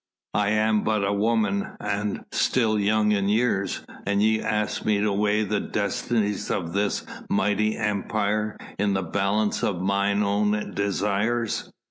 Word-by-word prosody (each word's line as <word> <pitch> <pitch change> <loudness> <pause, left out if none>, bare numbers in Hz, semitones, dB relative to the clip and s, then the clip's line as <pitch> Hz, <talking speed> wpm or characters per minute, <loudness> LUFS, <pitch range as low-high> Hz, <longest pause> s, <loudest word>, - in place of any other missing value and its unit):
I 100 -1 +2
am 110 0 +2
but 110 -2 +1
a 100 - +1
woman 105 -1 +1
and 105 0 -2
still 110 -4 +2
young 105 +1 +2
in 100 -1 +1
years, 105 -3 0 0.2
and 100 0 +2
ye 110 0 +3
ask 105 0 -1
me 105 -2 +2
to 105 0 +1
weigh 105 +1 +2
the 105 0 0
destinies 105 0 -1
of 85 -3 -2
this 100 +1 0 0.2
mighty 105 +2 +1
Empire 105 0 -1 0.2
in 100 0 +2
the 95 - 0
balance 100 +4 0
of 95 -4 0
mine 100 +2 +1
own 105 +1 0
desires." 105 +3 -1
105 Hz, 145 wpm, -25 LUFS, 100-110 Hz, 0.2 s, ye